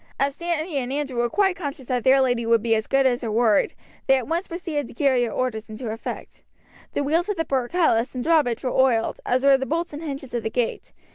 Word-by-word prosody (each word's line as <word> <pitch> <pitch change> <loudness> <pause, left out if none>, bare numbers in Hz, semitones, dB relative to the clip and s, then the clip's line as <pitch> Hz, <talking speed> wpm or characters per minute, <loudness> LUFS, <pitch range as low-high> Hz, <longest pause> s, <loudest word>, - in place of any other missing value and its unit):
As 275 +1 +1
Sandy 340 -1 -2
and 255 -1 -2
Andrew 275 -3 -3
were 240 0 +1
quite 385 - +2
conscious 285 -6 -6
that 250 -2 0
their 265 +1 +5
lady 245 -2 +1
would 230 -1 +2
be 230 -1 +2
as 220 0 0
good 270 0 +2
as 245 -2 +2
her 230 - -3
word, 220 -2 +2 0.3
they 270 - +5
at 255 - -4
once 335 +4 -1
proceeded 330 -6 -4
to - - -13
carry 260 -2 +2
her 230 - -4
orders 230 -3 -3
into 215 +1 -5
effect. 225 - -7 0.5
The 285 - 0
wheels 330 +7 +1
of 410 - -1
the 325 - 0
portcullis 260 -2 +1
and 250 - -2
drawbridge 300 -8 +2
were 255 - -1
oiled, 250 -4 +2
as 255 +2 +1
were 275 -1 +7
the 265 - -3
bolts 335 +1 -2
and 295 - -6
hinges 275 -5 -6
of 240 - -1
the 220 - -2
gate. 240 0 -2
265 Hz, 240 wpm, -23 LUFS, 240-305 Hz, 0.5 s, were